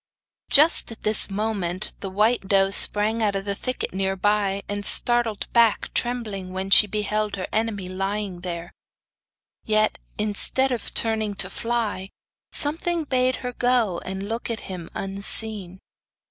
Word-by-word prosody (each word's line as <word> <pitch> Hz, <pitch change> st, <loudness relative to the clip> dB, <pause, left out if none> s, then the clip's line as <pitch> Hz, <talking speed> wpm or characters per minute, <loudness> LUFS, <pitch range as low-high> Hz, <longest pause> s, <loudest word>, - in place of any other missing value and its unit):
Just 300 Hz, -3 st, +4 dB
at 225 Hz, -, -10 dB
this 215 Hz, 0 st, +6 dB
moment 195 Hz, -3 st, -3 dB
the 195 Hz, -, -5 dB
white 210 Hz, +2 st, +1 dB
doe 195 Hz, -1 st, +3 dB
sprang 210 Hz, +3 st, +6 dB
out 205 Hz, -2 st, +1 dB
of 195 Hz, +1 st, -4 dB
a 200 Hz, -, 0 dB
thicket 255 Hz, +2 st, -4 dB
near 190 Hz, 0 st, -1 dB
by, 200 Hz, 0 st, 0 dB
and 205 Hz, 0 st, -4 dB
started 240 Hz, 0 st, +2 dB
back 230 Hz, -3 st, +2 dB
trembling 215 Hz, -7 st, -2 dB
when 190 Hz, +1 st, -4 dB
she 210 Hz, -, +7 dB
beheld 210 Hz, 0 st, -1 dB
her 185 Hz, -2 st, -4 dB
enemy 215 Hz, -4 st, -1 dB
lying 195 Hz, 0 st, -4 dB
there. 175 Hz, -1 st, -6 dB, 0.9 s
Yet, 215 Hz, 0 st, +1 dB, 0.2 s
instead 215 Hz, +5 st, 0 dB
of 245 Hz, -, -4 dB
turning 220 Hz, -2 st, 0 dB
to 190 Hz, 0 st, 0 dB
fly, 225 Hz, -5 st, -3 dB, 0.4 s
something 330 Hz, +3 st, -2 dB
bade 255 Hz, -2 st, +1 dB
her 250 Hz, -, -3 dB
go 245 Hz, -8 st, +1 dB
and 190 Hz, +1 st, -5 dB
look 230 Hz, +2 st, -4 dB
at 230 Hz, -2 st, -3 dB
him 180 Hz, -3 st, -8 dB
unseen. 195 Hz, -1 st, -2 dB
210 Hz, 145 wpm, -23 LUFS, 195-230 Hz, 0.9 s, she